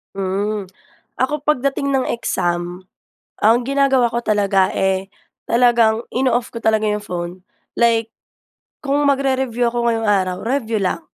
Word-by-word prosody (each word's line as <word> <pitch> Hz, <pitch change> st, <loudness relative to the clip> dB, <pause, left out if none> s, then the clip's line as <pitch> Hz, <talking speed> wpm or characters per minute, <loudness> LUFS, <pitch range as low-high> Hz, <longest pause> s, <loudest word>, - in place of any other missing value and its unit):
Mm. 195 Hz, +1 st, -2 dB, 0.5 s
Ako 290 Hz, +3 st, 0 dB
pagdating 280 Hz, -1 st, 0 dB
ng 265 Hz, -1 st, +1 dB
exam, 175 Hz, -5 st, -2 dB, 0.6 s
ang 225 Hz, +3 st, +5 dB
ginagawa 275 Hz, -2 st, +3 dB
ko 235 Hz, +1 st, -3 dB
talaga, 200 Hz, -2 st, +2 dB
eh, 190 Hz, 0 st, -1 dB, 0.4 s
talagang 235 Hz, -2 st, +3 dB
ino-off 245 Hz, -2 st, +1 dB
ko 230 Hz, -, -6 dB
talaga 220 Hz, -1 st, +2 dB
yong 210 Hz, 0 st, -1 dB
phone. 175 Hz, -2 st, -4 dB, 0.4 s
Like, 230 Hz, -1 st, +2 dB, 0.7 s
kung 285 Hz, 0 st, 0 dB
mag-re-review 265 Hz, -3 st, +1 dB
ako 235 Hz, 0 st, 0 dB
ngayong 225 Hz, -1 st, -1 dB
araw, 185 Hz, -3 st, +1 dB
review 235 Hz, -4 st, 0 dB
lang. 195 Hz, -, -1 dB
230 Hz, 130 wpm, -19 LUFS, 200-260 Hz, 0.7 s, ang